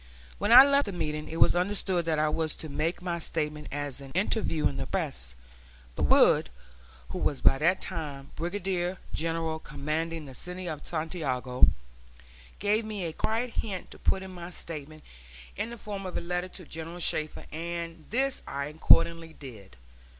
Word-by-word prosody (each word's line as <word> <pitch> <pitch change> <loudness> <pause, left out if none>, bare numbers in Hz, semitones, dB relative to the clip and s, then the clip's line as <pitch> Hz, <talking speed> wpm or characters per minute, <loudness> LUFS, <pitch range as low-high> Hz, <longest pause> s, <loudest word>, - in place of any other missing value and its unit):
When 210 - +1
I 255 +3 +12
left 280 0 +4
the - - -2
meeting 150 -3 -3
it 165 - -4
was - - +6
understood 185 -1 +1
that 160 -2 +1
I 155 0 +3
was 155 0 0
to 155 - -7
make 155 +5 -1
my 170 -1 -1
statement 150 -2 -2
as 145 -1 -3
an 135 - -9
interview 185 -4 +2
in 70 - -5
the 70 - -3
press; - - -3 0.6
but - - +1
Wood, - - +5 0.6
who 185 - -4
was 145 -6 0
by 135 - +6
that 170 +5 +3
time 145 -6 -5
Brigadier 180 +1 -1 0.2
General 165 0 -1
commanding 160 +2 -3
the 135 - -10
city 180 +6 -5
of 155 -3 -5
Santiago, 145 -7 +1 0.9
gave 210 +2 +2
me 210 -4 -4
a 160 - -3
quiet 230 +7 -1
hint 195 -5 -3
to - - -12
put 190 0 +1
my 175 -2 -8
statement 155 -3 -8 0.5
in 220 - -2
the 235 - -7
form 200 -3 -5
of 180 - -4
a - - -2
letter 180 +1 -2
to 180 -1 -10
General 165 +2 -7
Shafter, 155 -2 -1
and 165 0 -5
this 265 +3 0
I 140 0 -2
accordingly 165 +1 +4
did. 110 - -11
165 Hz, 170 wpm, -29 LUFS, 150-185 Hz, 0.9 s, I